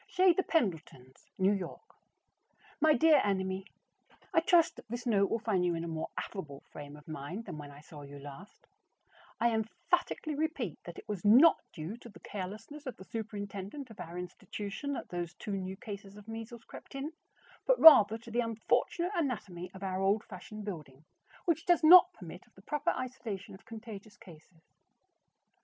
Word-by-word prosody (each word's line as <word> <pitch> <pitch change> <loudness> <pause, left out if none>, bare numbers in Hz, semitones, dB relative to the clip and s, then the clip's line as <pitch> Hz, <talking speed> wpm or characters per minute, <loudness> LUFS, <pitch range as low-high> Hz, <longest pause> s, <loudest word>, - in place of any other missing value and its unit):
CHEZ 365 -1 +4
THE 380 - +3
PENDLETONS, 160 - -2
New 190 +1 +4
York. 195 - -6 0.9
My 310 0 +5
dear 305 +2 +6
Enemy: 190 -1 -1 0.7
I 330 - +6
trust 335 0 +4
that - - -13
this 240 +2 -5
note 200 -4 +3
will - - +1
find 210 -5 0
you 175 -1 +1
in 165 - -3
a - - -4
more 160 -1 -4
affable 145 -8 -6
frame 145 0 -9
of 150 0 -16
mind 160 +8 -6
than 170 -6 -7
when 145 -1 -8
I 145 +1 -13
saw 150 -1 -12
you 145 0 -10
last. 145 +7 -12 0.7
I 235 0 +3
emphatically 305 +8 -1
repeat 290 - -2
that 175 - -8
it - - -11
was 205 -4 -4
not 250 +11 +7
due 165 +8 -6
to 240 - -12
the 205 - -14
carelessness 215 +10 -7
of 260 - -5
the - - -10
superintendent 210 +4 -6
of 215 - -14
our 170 +1 -7
institution 200 +8 -5
that - - -5
those 175 -1 -4
two 205 - -4
new 190 0 -4
cases 200 -1 -8
of 210 0 -13
measles 225 +1 -7
crept - - -12
in, 275 +3 -4 0.6
but - - +4
rather 225 -9 +10
to 230 0 -12
the 235 - 0
unfortunate 240 - 0
anatomy 205 - -3
of 190 +1 -10
our 190 0 -2
old 200 +3 +2
fashioned 210 +1 -9
building, 155 -7 -8 0.4
which 330 -2 0
does 350 -3 +4
not 360 +3 +9
permit 180 - -11
of - - -31
the 190 - -17
proper 295 - -1
isolation 245 -6 -4
of 190 - -14
contagious 215 -2 -9
cases. 160 -1 -16
205 Hz, 180 wpm, -32 LUFS, 180-250 Hz, 0.9 s, rather